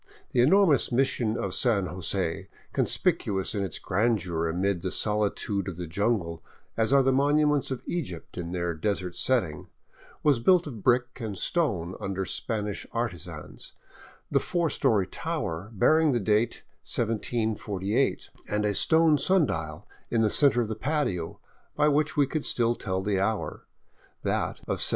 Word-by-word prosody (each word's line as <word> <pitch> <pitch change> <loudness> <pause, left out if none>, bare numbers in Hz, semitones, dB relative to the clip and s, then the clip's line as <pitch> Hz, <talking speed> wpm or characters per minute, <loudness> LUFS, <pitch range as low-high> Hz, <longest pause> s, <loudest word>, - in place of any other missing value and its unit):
The 120 - +3
enormous 160 0 +4
mission 120 -3 +1
of 95 - -3
San 110 -6 +2
Jose, 90 -1 -2 0.3
conspicuous 95 -1 0
in 100 - -1
its 95 - -2
grandeur 95 -7 0
amid 90 +2 0
the 90 0 -3
solitude 105 -1 0
of 90 -4 -5
the 90 - -4
jungle 85 -2 -1 0.3
as 110 +2 +1
are 140 -1 +5
the 135 - +3
monuments 145 +1 +2
of 130 -2 -4
Egypt 130 - -5
in 85 -1 -5
their 85 -1 -1
desert 90 +1 -2
setting, 110 -13 0 0.6
was 145 -5 +4
built 175 +8 +4
of 120 -8 -7
brick 125 +2 +1
and 105 -4 -4
stone 95 - -1
under 95 0 -2
Spanish 105 0 -3
artisans, 90 -9 -5 0.6
the - - +4
four 170 -4 -1
story 100 -4 +2
tower 100 - -4
bearing 155 +8 +3
the 120 - +1
date 105 +2 +1 0.2
1748, 110 0 -1 0.2
and 105 0 -1
a 105 - +1
stone 160 - +4
sun 185 0 +3
dial 80 - -5 0.2
in 115 - +1
the 110 -2 +2
center 140 -4 +5
of 115 - -1
the 110 - -3
patio, 130 - -2 0.4
by 150 - +3
which 150 +1 +1
we 145 - +5
could 155 +2 -3
still 120 -1 +2
tell 95 -5 -3
the 100 -1 0
hour, 105 +2 -2 0.6
that - - -1
of - - -2
1765. - - +3
110 Hz, 155 wpm, -27 LUFS, 95-135 Hz, 0.6 s, are